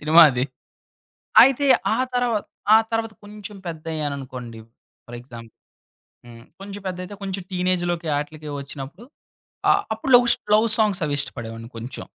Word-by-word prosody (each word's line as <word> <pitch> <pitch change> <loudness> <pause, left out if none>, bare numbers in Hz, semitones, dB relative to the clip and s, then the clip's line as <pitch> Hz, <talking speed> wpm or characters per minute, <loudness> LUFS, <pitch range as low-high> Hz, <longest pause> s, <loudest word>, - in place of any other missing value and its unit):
Cinema 160 +3 +7
అది. 125 -1 -1 1.0
అయితే 270 +2 +3 0.3
ఆ - - -2 0.2
తరువాత, 240 -4 0 0.3
ఆ - - +9
తరువాత 225 -1 -2
కొంచెం 210 0 -10
పెద్దయ్యాను 155 -3 -4
అనుకోండి 125 -4 -8 0.5
ఫర్ 120 0 -8
ఎగ్జాంపుల్ 120 -2 -12 0.7
హ్మ్. 115 -1 -13 0.2
కొంచెం 200 +1 -8
పెద్దైతే 185 +2 -6
కొంచెం 195 -1 -4
టీనేజ్‌లోకి 175 -2 -1
ఆటిలకి 150 +1 -7
ఒచ్చినప్పుడు 140 - -9 0.6
ఆ - - +8 0.2
అప్పుడు 240 +4 -4
లవ్స్ 240 -1 +4 0.2
లవ్ 215 +2 +4
సాంగ్స్ 210 -4 +1
అవి 145 -1 -1
ఇష్టపడేవాడిని 115 -4 -5
కొంచెం. 120 +3 -7
170 Hz, 135 wpm, -22 LUFS, 135-210 Hz, 1.0 s, ఆ